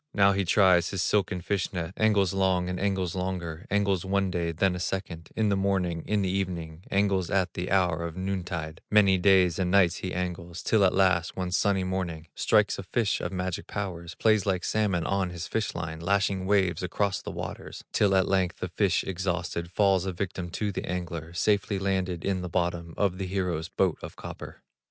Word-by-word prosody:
Now 100 Hz, -1 st, +5 dB
he 100 Hz, -1 st, 0 dB
tries 90 Hz, -2 st, +4 dB
his 95 Hz, -3 st, -1 dB
silken 95 Hz, -3 st, +1 dB
fish 100 Hz, +1 st, -1 dB
net, 90 Hz, -1 st, -4 dB
Angles 100 Hz, -4 st, +2 dB
long, 95 Hz, -2 st, +1 dB
and 90 Hz, -, -3 dB
angles 95 Hz, -3 st, 0 dB
longer, 90 Hz, -3 st, -4 dB
Angles 100 Hz, -3 st, +1 dB
one 95 Hz, 0 st, 0 dB
day, 85 Hz, -1 st, -1 dB
then 90 Hz, +3 st, +1 dB
a 90 Hz, -, -4 dB
second, 85 Hz, -2 st, -4 dB
In 110 Hz, -2 st, +2 dB
the 100 Hz, -, +2 dB
morning, 95 Hz, -4 st, 0 dB
in 105 Hz, -2 st, +1 dB
the 95 Hz, -, 0 dB
evening, 90 Hz, -4 st, -3 dB
Angles 95 Hz, -2 st, +1 dB
at 95 Hz, -2 st, +1 dB
the 90 Hz, -, -4 dB
hour 90 Hz, -4 st, +2 dB
of 85 Hz, 0 st, -5 dB
noontide, 90 Hz, -4 st, -4 dB
Many 100 Hz, -3 st, +5 dB
days 95 Hz, -2 st, +4 dB
and 90 Hz, -2 st, +1 dB
nights 90 Hz, -2 st, +4 dB
he 90 Hz, -, -4 dB
angles, 85 Hz, -1 st, -4 dB
Till 110 Hz, -3 st, +3 dB
at 95 Hz, -, +3 dB
last, 95 Hz, -3 st, +2 dB
one 90 Hz, -1 st, -2 dB
sunny 95 Hz, +1 st, +2 dB
morning, 85 Hz, -4 st, -3 dB
Strikes 105 Hz, -2 st, +2 dB
a -, -, -2 dB
fish 100 Hz, +2 st, 0 dB
of 85 Hz, -, -3 dB
magic 90 Hz, -1 st, -3 dB
powers, 90 Hz, -4 st, -5 dB
Plays 110 Hz, -3 st, +2 dB
like 90 Hz, -2 st, 0 dB
salmon 100 Hz, -6 st, 0 dB
on 95 Hz, -2 st, 0 dB
his 85 Hz, -1 st, -6 dB
fish 110 Hz, +4 st, -2 dB
line, 80 Hz, -1 st, -4 dB
Lashing 95 Hz, +1 st, 0 dB
waves 95 Hz, -3 st, +2 dB
across 95 Hz, +2 st, -1 dB
the -, -, -7 dB
waters, -, -, -7 dB
Till 100 Hz, -2 st, +3 dB
at 95 Hz, -1 st, +3 dB
length 95 Hz, -2 st, +1 dB
the -, -, -4 dB
fish -, -, +1 dB
exhausted 90 Hz, -2 st, -3 dB
Falls 95 Hz, 0 st, +2 dB
a -, -, 0 dB
victim 90 Hz, -1 st, -4 dB
to 105 Hz, +4 st, -2 dB
the -, -, -4 dB
angler, 85 Hz, -3 st, -4 dB
Safely 100 Hz, +2 st, +1 dB
landed 95 Hz, -3 st, -1 dB
in 95 Hz, -2 st, 0 dB
the 90 Hz, -, -5 dB
bottom 85 Hz, -2 st, -2 dB
Of 100 Hz, -2 st, 0 dB
the 95 Hz, -, -2 dB
hero's 90 Hz, -4 st, -2 dB
boat 95 Hz, -4 st, 0 dB
of -, -, -8 dB
copper. -, -, -9 dB
95 Hz, 200 wpm, -27 LUFS, 85-100 Hz, -, Now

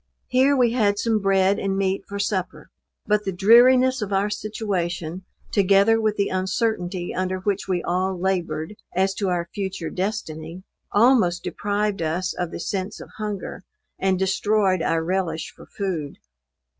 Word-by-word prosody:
Here 265 Hz, +3 st, +4 dB
we 245 Hz, -2 st, +4 dB
had 210 Hz, -4 st, +2 dB
some 220 Hz, +1 st, +1 dB
bread 195 Hz, 0 st, +2 dB
and 195 Hz, -1 st, -1 dB
meat 195 Hz, 0 st, 0 dB
for 200 Hz, -, -5 dB
supper: 200 Hz, -2 st, -3 dB, 0.3 s
but 210 Hz, 0 st, +2 dB
the 195 Hz, -, -2 dB
dreariness 245 Hz, +7 st, +5 dB
of 205 Hz, -1 st, -3 dB
our 200 Hz, +1 st, +1 dB
situation, 185 Hz, -5 st, -3 dB, 0.3 s
together 200 Hz, +3 st, +4 dB
with 215 Hz, -1 st, +1 dB
the 200 Hz, -, +1 dB
uncertainty 185 Hz, -1 st, -1 dB
under 185 Hz, 0 st, -1 dB
which 200 Hz, 0 st, -1 dB
we 180 Hz, -2 st, -1 dB
all 185 Hz, +1 st, -1 dB
labored, 185 Hz, 0 st, -2 dB, 0.2 s
as 190 Hz, +1 st, +2 dB
to 195 Hz, -1 st, -2 dB
our 175 Hz, -1 st, -1 dB
future 190 Hz, -5 st, -4 dB
destiny, 180 Hz, -3 st, -4 dB, 0.3 s
almost 210 Hz, -6 st, +4 dB
deprived 205 Hz, +1 st, -1 dB
us 170 Hz, +3 st, -1 dB
of 175 Hz, -2 st, -3 dB
the -, -, -7 dB
sense 190 Hz, +3 st, -3 dB
of -, -, -10 dB
hunger, 210 Hz, -2 st, -5 dB, 0.4 s
and 190 Hz, -1 st, +2 dB
destroyed 190 Hz, 0 st, +1 dB
our 165 Hz, 0 st, +1 dB
relish 170 Hz, -2 st, -2 dB
for -, -, -14 dB
food. 175 Hz, -8 st, -4 dB
195 Hz, 155 wpm, -23 LUFS, 180-210 Hz, 0.4 s, dreariness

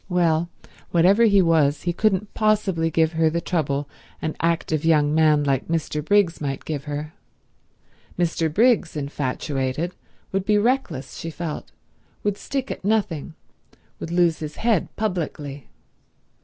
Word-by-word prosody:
Well, 170 Hz, -2 st, +2 dB, 0.4 s
whatever 190 Hz, +7 st, +5 dB
he 200 Hz, -3 st, +5 dB
was 155 Hz, -4 st, +2 dB
he 175 Hz, -, 0 dB
couldn't 200 Hz, +1 st, 0 dB
possibly 205 Hz, -6 st, +1 dB
give 160 Hz, 0 st, +2 dB
her 160 Hz, 0 st, +3 dB
the 170 Hz, +2 st, -1 dB
trouble 145 Hz, -5 st, -1 dB, 0.3 s
an 155 Hz, -, -3 dB
active 165 Hz, -2 st, 0 dB
young 150 Hz, -2 st, +3 dB
man 155 Hz, -2 st, +4 dB
like 135 Hz, -2 st, 0 dB
Mr. 155 Hz, -2 st, -2 dB
Briggs 195 Hz, -1 st, +2 dB
might 135 Hz, -2 st, -3 dB
give 150 Hz, -2 st, -4 dB
her. 150 Hz, +1 st, -5 dB, 1.0 s
Mr. 165 Hz, -2 st, 0 dB
Briggs, 215 Hz, -4 st, +3 dB
infatuated, 140 Hz, +2 st, -2 dB, 0.4 s
would 195 Hz, 0 st, 0 dB
be 210 Hz, +1 st, +3 dB
reckless, 205 Hz, -, -1 dB
she 165 Hz, -, -5 dB
felt, 155 Hz, -, -6 dB, 0.5 s
would 205 Hz, -1 st, 0 dB
stick 275 Hz, -1 st, -3 dB
at -, -, -6 dB
nothing, 195 Hz, -8 st, -1 dB, 0.6 s
would -, -, -5 dB
lose 170 Hz, -1 st, +2 dB
his 155 Hz, -1 st, -6 dB
head 225 Hz, -6 st, +1 dB
publicly. 155 Hz, -, -3 dB
165 Hz, 140 wpm, -23 LUFS, 150-190 Hz, 1.0 s, whatever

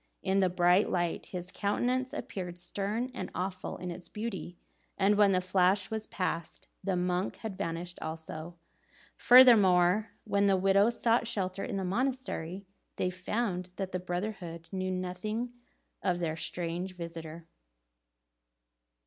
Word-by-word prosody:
In 190 Hz, +1 st, +2 dB
the 190 Hz, -1 st, +4 dB
bright 180 Hz, +2 st, +4 dB
light, 175 Hz, -2 st, -1 dB
his 180 Hz, -1 st, -6 dB
countenance 250 Hz, +7 st, 0 dB
appeared 180 Hz, -11 st, -5 dB
stern 205 Hz, +7 st, -2 dB
and -, -, -5 dB
awful 185 Hz, +1 st, -3 dB
in 180 Hz, -1 st, -5 dB
its 175 Hz, +1 st, -6 dB
beauty, 210 Hz, -5 st, -5 dB, 0.4 s
and 200 Hz, +1 st, +4 dB
when 205 Hz, -1 st, +5 dB
the 185 Hz, -, +3 dB
flash 185 Hz, +2 st, +2 dB
was 220 Hz, 0 st, -2 dB
passed, 170 Hz, -3 st, -3 dB, 0.2 s
the 195 Hz, -2 st, 0 dB
monk 180 Hz, +1 st, 0 dB
had 220 Hz, -4 st, -6 dB
vanished 170 Hz, 0 st, -4 dB
also. 160 Hz, +1 st, -5 dB, 0.6 s
Furthermore, 210 Hz, -5 st, +7 dB
when 200 Hz, -1 st, +2 dB
the 195 Hz, -1 st, +4 dB
widows 200 Hz, +5 st, +3 dB
sought 230 Hz, 0 st, +3 dB
shelter 195 Hz, -3 st, -2 dB
in 215 Hz, -6 st, -3 dB
the 190 Hz, -, -2 dB
monastery, 200 Hz, -5 st, -2 dB, 0.3 s
they 180 Hz, -, 0 dB
found 185 Hz, -1 st, -2 dB
that 190 Hz, -1 st, -4 dB
the 185 Hz, -, -2 dB
brotherhood 175 Hz, -2 st, -4 dB
knew 185 Hz, -1 st, -2 dB
nothing 185 Hz, +6 st, -3 dB, 0.5 s
of 180 Hz, -3 st, +1 dB
their 165 Hz, -2 st, -1 dB
strange 175 Hz, +3 st, -3 dB
visitor. 165 Hz, -1 st, -7 dB
185 Hz, 140 wpm, -31 LUFS, 175-205 Hz, 0.6 s, Furthermore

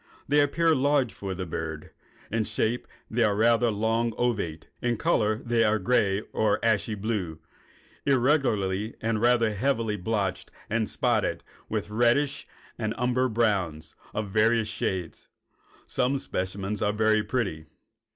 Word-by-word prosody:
They 145 Hz, +2 st, +4 dB
appear 160 Hz, +3 st, +3 dB
large 140 Hz, -3 st, +2 dB
for 95 Hz, -1 st, -5 dB
the 95 Hz, 0 st, -4 dB
bird. 80 Hz, -2 st, -5 dB, 0.4 s
In 115 Hz, +1 st, +1 dB
shape 115 Hz, +4 st, -1 dB, 0.2 s
they 120 Hz, +2 st, 0 dB
are 105 Hz, -3 st, +4 dB
usually 105 Hz, -, 0 dB
rather 115 Hz, +1 st, +3 dB
long 115 Hz, +2 st, 0 dB
ovate, 100 Hz, -10 st, -1 dB
and 120 Hz, -1 st, +1 dB
in -, -, -4 dB
color 110 Hz, +2 st, +1 dB, 0.2 s
are 110 Hz, 0 st, +3 dB
gray 105 Hz, -4 st, +2 dB
or 105 Hz, -2 st, +2 dB
ashy 110 Hz, -1 st, +1 dB
blue, 100 Hz, -6 st, -3 dB, 0.7 s
irregularly 120 Hz, -7 st, +1 dB
and 110 Hz, -1 st, -1 dB
rather 120 Hz, -2 st, +3 dB
heavily 110 Hz, -1 st, 0 dB
blotched 95 Hz, -2 st, -2 dB, 0.2 s
and 110 Hz, -1 st, 0 dB
spotted -, -, 0 dB, 0.3 s
with -, -, -3 dB
reddish 120 Hz, +6 st, +2 dB, 0.3 s
and 110 Hz, 0 st, -2 dB
umber 125 Hz, +1 st, +1 dB
browns 100 Hz, -9 st, 0 dB, 0.2 s
of 105 Hz, -2 st, -4 dB
various 110 Hz, +1 st, +3 dB
shades. 95 Hz, -5 st, -4 dB, 0.6 s
Some 130 Hz, +2 st, 0 dB
specimens 95 Hz, -2 st, -3 dB
are 105 Hz, 0 st, +1 dB
very 110 Hz, 0 st, +3 dB
pretty. 95 Hz, -12 st, -2 dB
110 Hz, 140 wpm, -27 LUFS, 100-120 Hz, 0.7 s, They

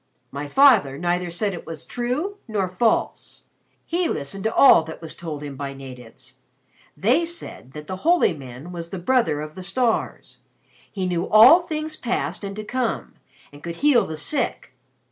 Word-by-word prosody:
My 140 Hz, +1 st, -5 dB
father 215 Hz, -, +5 dB
neither 175 Hz, +1 st, -1 dB
said 195 Hz, +4 st, -2 dB
it 175 Hz, -, -9 dB
was 165 Hz, -2 st, -8 dB
true 275 Hz, +12 st, -3 dB
nor 205 Hz, -4 st, -1 dB
false. 200 Hz, +5 st, -1 dB, 0.4 s
He 345 Hz, 0 st, 0 dB
listened 165 Hz, +8 st, -4 dB
to 220 Hz, -, 0 dB
all 270 Hz, -11 st, +7 dB
that 160 Hz, -, -9 dB
was 160 Hz, -2 st, -7 dB
told 155 Hz, -4 st, -6 dB
him 145 Hz, -2 st, -7 dB
by 140 Hz, 0 st, -6 dB
natives. 125 Hz, -4 st, -12 dB, 0.6 s
They 250 Hz, -, +3 dB
said 335 Hz, -, -7 dB
that 150 Hz, 0 st, -8 dB
the 185 Hz, +4 st, -5 dB
holy 335 Hz, -, +3 dB
man 135 Hz, +2 st, -10 dB
was 170 Hz, -1 st, -7 dB
the 190 Hz, -, -5 dB
brother 180 Hz, -, +1 dB
of 155 Hz, 0 st, -7 dB
the 185 Hz, -, -9 dB
stars. 225 Hz, +5 st, -2 dB, 0.5 s
He 190 Hz, -2 st, -3 dB
knew 175 Hz, -1 st, -1 dB
all 235 Hz, +11 st, +9 dB
things 310 Hz, -2 st, -5 dB
past 240 Hz, -3 st, -3 dB
and 200 Hz, 0 st, -5 dB
to 215 Hz, -, -6 dB
come, 245 Hz, +1 st, -3 dB, 0.4 s
and 145 Hz, 0 st, -14 dB
could 170 Hz, +1 st, -6 dB
heal 285 Hz, -1 st, +3 dB
the 160 Hz, -, -6 dB
sick. 280 Hz, -, -3 dB
185 Hz, 175 wpm, -23 LUFS, 155-250 Hz, 0.6 s, all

